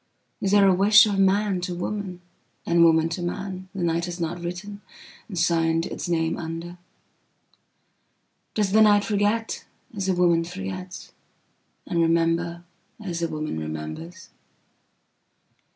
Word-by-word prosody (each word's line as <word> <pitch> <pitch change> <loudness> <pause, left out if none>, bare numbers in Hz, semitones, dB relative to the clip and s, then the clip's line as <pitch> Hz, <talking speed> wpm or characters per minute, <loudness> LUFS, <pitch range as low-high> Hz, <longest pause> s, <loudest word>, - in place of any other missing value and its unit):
Is 195 - 0
there 200 0 +5
a 190 - +5
wishof 205 +1 +5
man 195 -1 +2
to 180 0 -3
womanand 185 0 -4 0.4
woman 165 -1 +4
to 165 +2 -4
manthe 185 +1 -5
night 170 -2 0
has 175 0 -6
not 170 +1 -3
writtenand 180 +4 -6 0.6
signed 165 -1 +1
its - - -5
name 165 -1 0
under? 170 +1 -6 1.8
Does 205 -3 +1
the 220 +2 +5
night 205 -1 +5
forgetas 205 -1 -2
a 185 - +2
woman 170 -2 +3
forgets?and 185 -1 -8
rememberas 170 +2 -2
a 170 - +1
woman 155 - -4
remembers? 80 - -7
175 Hz, 110 wpm, -24 LUFS, 165-195 Hz, 1.8 s, there